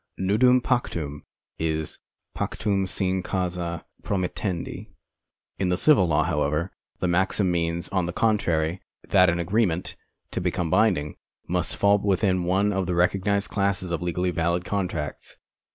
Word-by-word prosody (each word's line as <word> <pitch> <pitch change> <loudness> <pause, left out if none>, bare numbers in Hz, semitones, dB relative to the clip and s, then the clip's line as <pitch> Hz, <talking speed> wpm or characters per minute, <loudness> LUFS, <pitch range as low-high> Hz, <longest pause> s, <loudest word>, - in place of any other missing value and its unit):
Nudum 125 +7 +4
iMctum 85 - -1 0.4
is 80 -1 -2 0.4
pactum 100 -3 -1
nine, 95 -1 +1
causa 90 -2 -3 0.2
promiilendi. 95 -1 -3 0.6
In 95 - +1
the 90 - +1
civil 130 -7 +5
law, 80 -1 +2
however, 75 +1 0 0.3
the 90 - -1
maxim 95 +2 +2
means, 85 0 -1
on 95 -3 0
the - - -2
contrary, 85 -5 +1 0.3
that 90 -1 +5
an 85 - +1
agreement, 90 0 0 0.4
to - - -2
become 85 -3 -1
binding, 95 -7 +2 0.3
must - - 0
fall 100 0 +4
within 95 -2 +1
one 100 +3 +2
of 95 -2 -1
the 90 - 0
recog 90 +2 +1
nised 100 0 +1
classes 100 -3 -1
of 85 - -2
legally 90 +1 -1
valid 85 +1 0
contracts. 90 -7 -3
90 Hz, 140 wpm, -25 LUFS, 85-100 Hz, 0.6 s, civil